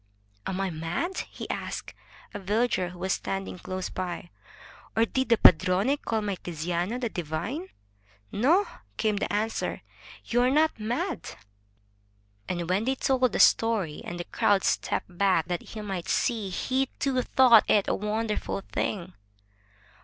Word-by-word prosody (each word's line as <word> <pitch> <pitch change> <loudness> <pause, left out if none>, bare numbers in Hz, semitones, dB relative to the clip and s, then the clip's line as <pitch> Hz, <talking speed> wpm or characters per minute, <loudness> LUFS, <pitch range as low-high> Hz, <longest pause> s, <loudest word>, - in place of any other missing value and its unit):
"Am 190 0 -2
I 195 -1 -1
mad/' 170 - -3
he - - -7
asked - - -5 0.4
a 205 - -4
villager 205 -1 +1
who 180 - -11
was 190 +1 0
standing 195 -1 -4
close 185 0 -4
by, 175 -1 -5 0.6
"or 225 - +4
did 260 +3 -1
the 230 - +5
padrone 185 - +5
call 225 -5 -2
my 200 -2 -2
Tiziano 175 +7 -2
'the 240 -3 -1
divine'?" 195 - -4 0.6
"No," 325 - +3 0.3
came 215 -2 +1
the - - -2
answer. 215 +2 -1 0.4
"You 240 +1 +2
are 250 - +4
not 305 -1 +2
mad." 275 - -3 1.1
And 175 -2 -2
when 190 +5 +1
they 265 +1 +1
told 260 -1 +2
him 250 - +2
the - - -2
story, 215 -9 +3
and 175 0 -6
the - - -2
crowd 195 +2 +2
stepped 180 - -1
back 190 -5 +3
that 175 -1 -1
he 220 - -8
might 195 -4 -4
see, 220 -5 0
he, 260 +8 0
too, 265 -2 +1
thought 245 -3 +6
it 205 -2 +4
a - - +2
wonderful 210 -1 -2
thing. 185 -3 -2
205 Hz, 155 wpm, -27 LUFS, 180-245 Hz, 1.1 s, thought